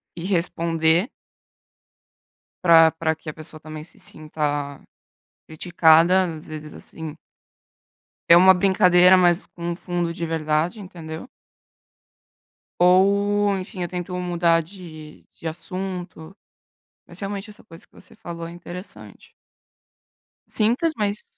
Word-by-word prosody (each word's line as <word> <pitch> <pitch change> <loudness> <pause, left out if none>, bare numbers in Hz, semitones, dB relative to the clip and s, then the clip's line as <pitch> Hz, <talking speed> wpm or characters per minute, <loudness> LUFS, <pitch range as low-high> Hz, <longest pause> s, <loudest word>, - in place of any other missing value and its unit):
e 170 - -7
responder. 170 - +1 1.5
Para 165 -2 +7
para 160 0 -1
que 160 0 -10
a - - -6
pessoa 155 0 -6
também 155 0 -9
se 160 - -17
sinta 145 -2 -4 0.7
criticada, 170 +2 +3
às 155 - -12
vezes, 155 -1 -8
assim 160 -2 -9 1.1
é 170 - +9
uma 190 +2 +7
brincadeira, 180 -1 +5
mas 175 -1 +3
com 170 0 -6
um - - -3
fundo 175 -1 -3
de 170 - -4
verdade, 160 +4 -1
entendeu? 165 -1 -9 1.5
Ou, 200 +3 +3
enfim, 185 0 -7
eu - - -2
tento 180 +1 -6
mudar 170 -2 +1
de 160 -3 -12
de 165 - -8
assunto, 180 0 -7 0.7
mas - - -10
realmente 200 +1 -5
essa 210 - -12
coisa 165 +1 -14
que - - -51
você 190 +4 -15
falou 170 -5 -7
é - - -8
interessante. 175 +2 -10 1.1
Simples, 240 +9 +2
mas, 205 -2 -2
175 Hz, 120 wpm, -22 LUFS, 160-185 Hz, 1.5 s, é